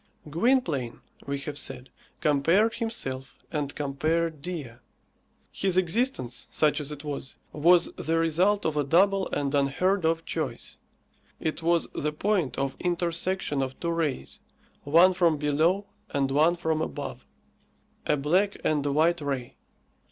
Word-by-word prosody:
Gwynplaine, 160 - +1 0.3
we 140 0 -1
have 145 0 -4
said, 130 -1 -5 0.3
compared 165 +10 +3
himself 135 - -4
and 145 -3 -2
compared 155 +2 -1
Dea. 150 -9 -6 0.7
His 190 -2 0
existence, 185 - 0
such 155 0 +2
as 150 0 -4
it 145 0 -8
was, 140 -3 -5 0.2
was 170 +3 +4
the 165 +1 -1
result 175 +6 +2
of 160 - 0
a 150 - +2
double 190 +6 +3
and 140 -1 -1
unheard 145 +8 +1
of 165 0 +1
choice. 140 -8 -4 0.6
It 160 +1 -3
was 170 0 +2
the 150 - -1
point 180 -2 0
of 135 -1 -1
intersection 175 -3 0
of 130 0 -4
two 170 - -1
rays 160 -5 -2 0.5
one 170 +6 +6
from 170 -4 +3
below 155 +7 +1 0.2
and 135 -1 0
one 155 +5 +4
from 160 -2 -1
above 70 - -5 0.8
a - - +3
black 180 +9 +1
and 150 -2 +2
a 145 - 0
white 160 +3 +2
ray. 135 -4 -3
155 Hz, 140 wpm, -27 LUFS, 140-175 Hz, 0.8 s, one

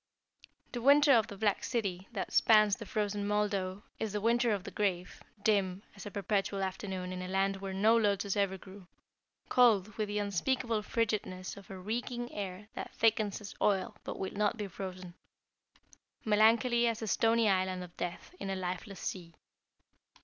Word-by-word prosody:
The 240 - -4
winter 285 +3 +6
of 225 -3 +4
the 200 - -9
black 205 -1 +1
city 195 -6 -2
that 200 -5 -4
spans 215 -3 +5
the 225 - -9
frozen 205 0 -1
Moldau 205 -2 -1 0.2
is 220 -2 -2
the 210 - 0
winter 235 +3 +2
of 200 -3 -1
the - - -7
grave, 180 -4 -2 0.2
dim 195 -2 +1
as 200 +1 -8
a - - -4
perpetual 200 0 -1
afternoon 185 -1 -4
in 180 - -5
a 180 - -5
land 195 +1 +1
where 195 0 -5
no 210 +4 +4
lotus 200 -3 +1
ever 200 -2 +1
grew, 190 0 -13 0.6
cold 215 -5 +4
with 215 - 0
the 205 0 -3
unspeakable 215 +3 0
frigidness 210 -5 -2
of 200 -2 -13
a 190 - -7
reeking 240 +5 -4
air 195 0 -5
that - - -7
thickens 215 -2 +2
as 200 - -8
oil 205 +2 +1
but - - -5
will 190 - -4
not 210 +2 +1
be 210 - -3
frozen, 185 -1 -7 1.1
melancholy 230 +3 +4
as 230 -1 -1
a - - -3
stony 225 +2 +3
island 185 -2 +1
of 175 -1 -12
death 175 - -5
in 195 - -4
a 195 - -1
lifeless 185 +1 -5
sea. 170 -3 -5
205 Hz, 175 wpm, -32 LUFS, 190-220 Hz, 1.1 s, winter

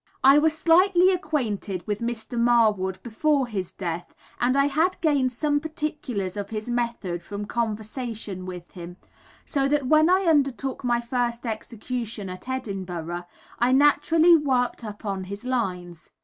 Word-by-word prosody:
I 275 +2 +8
was 315 +1 +2
slightly 360 +3 +5
acquainted 240 - -2
with 210 -1 -2
Mr. 235 0 -4
Marwood 220 -6 +3
before 275 +4 +1
his 195 -7 -4
death, 175 -2 -5 0.2
and 255 +3 +2
I 275 - +4
had 320 +6 +1
gained 280 -5 +2
some 290 +4 0
particulars 295 - -4
of 200 -1 -4
his 215 0 -5
method 235 -8 -2
from 205 +2 -6
conversation 220 -3 -4
with 180 -1 -8
him; 175 0 -9 0.5
so 275 -2 0
that 290 -1 +1
when 310 +4 +5
I 370 +1 +4
undertook 275 -4 +1
my 240 -1 +1
first 240 0 -2
execution, 225 -1 -4
at 185 +7 -9
Edinburgh, 180 -8 -4 0.3
I 245 +2 +3
naturally 305 +4 +5
worked 260 -6 0
upon 205 -3 -5
his 200 +5 -8
lines. 180 -9 -3
240 Hz, 145 wpm, -25 LUFS, 200-285 Hz, 0.5 s, I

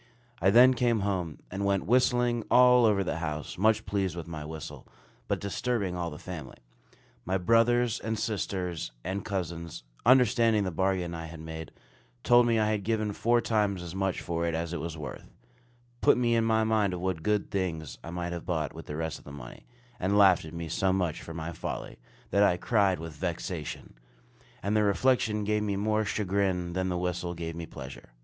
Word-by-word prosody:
I 95 - +5
then 125 +5 +7
came 120 -3 +1
home, 90 -6 -2
and 95 +2 -3
went 100 -3 +1
whistling 120 +1 +2
all 125 -1 +6
over 100 -3 +3
the 90 - -2
house, 75 -2 -4
much 110 +1 +3
pleased 95 -3 -1
with 85 -2 -6
my 80 -3 -6
whistle, 75 -2 -8 0.4
but - - 0
disturbing 100 -2 -2
all 85 -1 -2
the 75 - -8
family. 80 -6 -8 0.7
My 95 +1 0
brothers, 115 +4 +3
and 110 0 -3
sisters, 95 - -3
and 95 +3 -3
cousins, 85 -6 -4 0.2
understanding 115 -3 +4
the 95 - -2
bargain 90 0 0
I 80 0 -5
had 80 0 -10
made, 80 0 -7 0.5
told 120 -1 +6
me 115 -1 +3
I 110 -1 +2
had 105 -2 -1
given 110 -1 0
four 120 +3 +2
times 105 -5 0
as 85 -1 -7
much 95 -1 -1
for 85 0 -2
it 85 - -1
as 85 +1 -3
it 85 - -2
was 80 +1 -5
worth; 75 -2 -8 0.7
put - - +5
me 120 -1 +2
in 115 -1 +2
mind 110 -3 +2
of - - -5
what 90 -2 -2
good 105 +3 0
things 85 -6 -3
I - - -7
might 85 0 -4
have 85 - -5
bought 80 -5 -2
with - - -10
the 75 - -5
rest 80 0 -3
of - - -21
the 70 - -9
money; 65 -4 -11 0.3
and 100 +3 +1
laughed 95 -5 +6
at 80 - -9
me 85 -1 -4
so 95 +3 +1
much 90 -4 -1
for 80 - -8
my 80 +1 -4
folly, 80 - -6 0.3
that 100 - +3
I 95 -3 +4
cried 100 -1 +2
with 80 0 -7
vexation; 85 -2 -4 0.7
and 100 +2 0
the 105 - +4
reflection 105 +1 +2
gave 105 +1 +1
me 105 -2 -1
more 105 +2 +1
chagrin 95 -4 0
than 95 +1 -1
the 90 - -1
whistle 90 0 -2
gave 85 -1 -5
me 85 -1 -6
pleasure. - - -10
95 Hz, 200 wpm, -29 LUFS, 85-110 Hz, 0.7 s, then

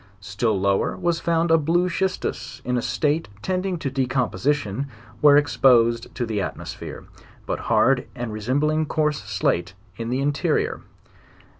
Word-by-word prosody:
Still 100 +2 -1
lower 100 0 +1
was 170 -1 0
found 165 0 +1
a 165 - +6
blue 170 +4 +2
schistus, 185 -9 -2
in 125 - 0
a 120 - +1
state 150 +5 0 0.2
tending 185 0 -1
to 140 -4 -3
decomposition 130 -1 0 0.3
where 145 -1 +7
exposed 120 -3 +3
to 125 - -1
the 110 -3 -2
atmosphere, - - -6 0.4
tut - - -2
hard 135 0 +2
and 120 -3 -4
resembling 145 +8 0
coarse 150 -2 0
slate 95 -2 -1 0.2
in 115 0 -4
the 130 +2 0
interrior. 145 +1 0
135 Hz, 140 wpm, -23 LUFS, 115-155 Hz, 0.4 s, where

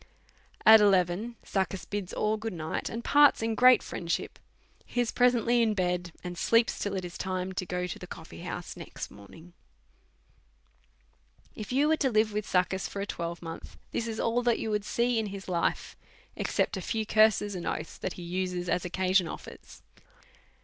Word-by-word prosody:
At 220 0 +10
eleven, 195 +3 +2
Succus 190 -1 -2
bids 205 -3 -4
all 215 +1 0
good 220 0 -5
night, 160 -2 -3
and 230 +1 -5
parts 290 -5 +5
in 225 0 0
great 250 +1 +6
friendship. 170 -1 -3 0.4
He 245 - -4
is 240 -2 +1
presently 245 -1 +3
in 220 -2 +2
bed, 180 -2 -1
and 180 -1 -6
sleeps 230 0 +3
till 205 -1 -2
it 185 -1 -3
is 175 - -8
time 185 0 -2
to 185 0 -4
go 180 +1 -2
to 180 - -6
the - - -9
coffee - - -10
house - - -6
next - - -8
morning. 160 - -14 2.0
If 215 +1 -7
you 280 +4 +3
was 315 0 +2
to 270 - +2
live 215 -2 +2
with 210 0 -2
Succus 185 +1 +1
for 200 - -6
a 200 - -2
twelvemonth, 170 -3 -6
this 235 - -2
is 220 -1 -4
all 230 +2 +1
that 240 -1 +2
you 220 - -3
w^ould 210 -1 -1
see 235 +1 +1
in 220 - -2
his 195 -1 -8
life, 175 -2 -1 0.4
except - - 0
a - - -4
few 220 +4 -2
curses 215 -1 +3
and 180 -2 -5
oaths 155 - -4
that 185 - -3
he 175 - -9
uses 180 0 -3
as 175 - +1
occasion 185 0 +1
offers. - - -10
200 Hz, 185 wpm, -29 LUFS, 180-225 Hz, 2.0 s, At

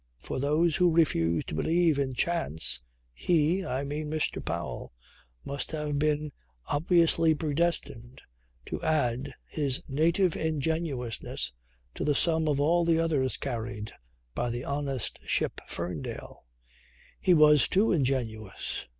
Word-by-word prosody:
For - - -5
those 150 +4 +2
who 180 -1 +4
refuse 85 - +2
to - - -7
believe 160 - +2
in 130 -2 -1
chance 145 - 0 0.3
he, 165 - +1
I 130 -1 -2
mean 150 +2 -4
Mr. 155 0 -1
Powell, - - -4 0.5
must 140 +2 -3
have 150 -2 -2
been 150 0 0 0.3
obviously 165 0 +3
predestined 150 -5 -1 0.5
to - - -5
add 140 -6 0
his 140 -4 -1
native 165 +5 +2
ingenuousness 145 - -2 0.4
to - - -4
the 145 - +2
sum 160 0 +3
of 145 -2 +1
all 170 +4 +3
the 165 -1 +3
others 150 -6 +1
carried 115 -4 -4 0.4
by 120 - -1
the 120 +1 -3
honest 140 -3 -2
ship - - +1
Ferndale. 85 -7 -5 0.7
He 180 - +4
was 150 -4 +6
too 205 +4 +3
ingenuous. 120 - -2
150 Hz, 125 wpm, -28 LUFS, 125-165 Hz, 0.7 s, was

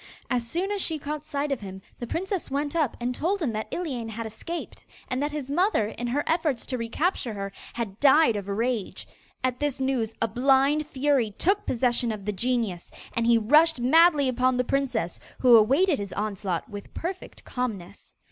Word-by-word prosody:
As 240 -2 0
soon 370 - -1
as 405 -1 -1
she 320 -3 0
caught 300 +1 -5
sight 285 -1 -2
of 275 - 0
him, 190 -2 -8 0.2
the 240 - -5
princess 380 - -3
went 285 +3 -2
up 305 -8 +1
and 245 +1 -1
told 360 +10 0
him 300 -9 -1
that 215 0 -4
Iliane 260 -10 -3
had 225 +1 -5
escaped, 275 +11 -6 0.2
and 255 +1 -2
that 295 +1 -1
his 290 -3 -5
mother, 345 - +2
in 240 +2 -5
her 280 +5 0
efforts 320 -7 0
to 255 - -3
recapture 235 - -1
her, 195 0 -4 0.2
had 220 -4 -4
died 285 -3 +5
of 200 -1 -4
rage. 225 0 -2 0.4
At 255 -1 0
this 290 -2 -1
news 255 -5 -1
a 230 - +1
blind 275 +6 +3
fury 275 -5 +1
took 400 +3 +1
possession 240 -1 +1
of 205 -3 -6
the 210 - 0
genius, 225 -4 -1 0.2
and 230 0 0
he 235 -1 +6
rushed 300 +7 +5
madly 300 +3 +5
upon 255 0 +2
the 250 - +2
princess, 250 -10 -1 0.2
who 250 -2 +6
awaited 275 - +4
his 200 -2 -5
onslaught 200 -4 -3
with 205 -3 -10
perfect 370 +2 -6
calmness. 205 -7 -5
255 Hz, 190 wpm, -26 LUFS, 225-300 Hz, 0.4 s, he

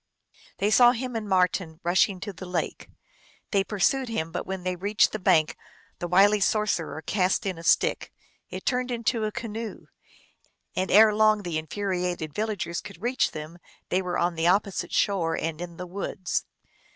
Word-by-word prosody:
They 205 +2 +1
saw 240 +3 +7
him 250 0 -4
and 215 -2 -4
Marten 180 -3 +1
rushing 185 +2 +2
to 205 0 -5
the 185 +1 -9
lake. 180 -2 -3 0.6
They 195 -2 +3
pursued 230 +6 0
him, 165 -8 -2
but - - -4
when 190 -1 -5
he 185 0 -1
reached 205 +4 +2
the 215 - -4
bank 170 -5 +3 0.4
the 175 - -3
wily 200 +4 +5
sorcerer 195 -7 0
cast 185 +4 +1
in 185 -4 -3
a - - -10
stick; - - +2 0.4
it - - -7
turned 250 -1 0
into 235 -2 -1
a 215 - -2
canoe, 225 0 -6 0.9
and 185 +1 -1
long 215 +1 +6
ere 205 - -9
the 170 -3 -2
infuriated 180 -2 -3
villagers 205 -4 -2
could 200 -4 -11
reach 245 +6 +1
them 155 +3 -8 0.3
they 185 - +1
were 180 -1 -2
on 175 0 +1
the 165 0 0
opposite 195 +1 +1
shore 170 -5 +1
and 165 0 -3
in 170 -1 -7
the 180 - -5
woods. 185 0 -3
190 Hz, 175 wpm, -26 LUFS, 175-215 Hz, 0.9 s, saw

